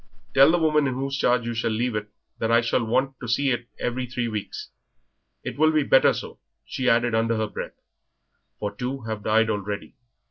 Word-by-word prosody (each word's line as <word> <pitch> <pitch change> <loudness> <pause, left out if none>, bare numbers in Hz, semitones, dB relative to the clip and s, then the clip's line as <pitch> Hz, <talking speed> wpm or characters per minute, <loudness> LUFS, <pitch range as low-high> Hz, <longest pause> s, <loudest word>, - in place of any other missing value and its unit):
Tell 135 +2 +7
the 175 - +4
woman 150 -3 +2
in 130 - -2
whose 135 +1 -2
charge 125 -3 +2
you 115 0 -1
leave 115 +1 -1
it 105 0 -3 0.3
that 115 0 0
I 115 0 +5
shall 115 +1 0
want 130 +3 0
to 120 - -7
see 135 +4 +1
it 120 0 -2
every 125 +1 -2
three 120 -1 -2
weeks. 105 -3 -5 0.7
It - - -6
will 155 0 +5
be 155 -1 +2
better 135 - +5
so," - - -7 0.3
she 130 - -1
added 120 0 +2
under 115 0 +1
her 110 - 0
breath, 105 - -7 0.8
"for 105 -1 -4
two 130 +4 -4
have 110 -2 -5
died 110 +2 +2
already." 100 -1 -4
120 Hz, 200 wpm, -24 LUFS, 110-135 Hz, 0.8 s, Tell